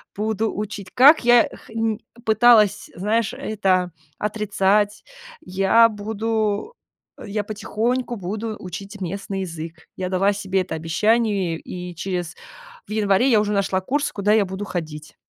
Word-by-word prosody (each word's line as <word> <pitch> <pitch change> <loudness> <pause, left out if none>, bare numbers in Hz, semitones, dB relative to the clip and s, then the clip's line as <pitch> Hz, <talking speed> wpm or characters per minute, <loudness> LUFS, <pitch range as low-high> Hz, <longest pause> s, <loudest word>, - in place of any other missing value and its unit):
буду 220 +1 -1
учить, 200 -2 -5
как 275 +1 +6
я 240 -1 +6
х 225 - -14
м, 225 -1 0 0.3
пыталась, 220 -2 +4
знаешь, 215 +4 0
это 190 -4 0 0.3
отрицать, 205 -1 +1 0.4
я 195 +5 +4
буду 220 - -2 0.5
я 210 0 -2
потихоньку 225 +4 -2
буду 215 +3 -4
учить 195 +2 -8
местный 195 +2 -4
язык. 165 -2 -7
Я 185 - -3
дала 195 +2 +2
себе 195 -2 -1
это 170 - -4
обещание 195 +2 +1
и 180 +1 -8
через 175 -1 -4 0.5
в - - -12
январе 210 +2 +2
я 220 - +5
уже 210 0 0
нашла 195 -2 0
курс, 285 +8 -1
куда 205 +1 +1
я 215 -2 +4
буду 190 +2 -5
ходить. 155 -5 -6
205 Hz, 135 wpm, -22 LUFS, 190-220 Hz, 0.5 s, как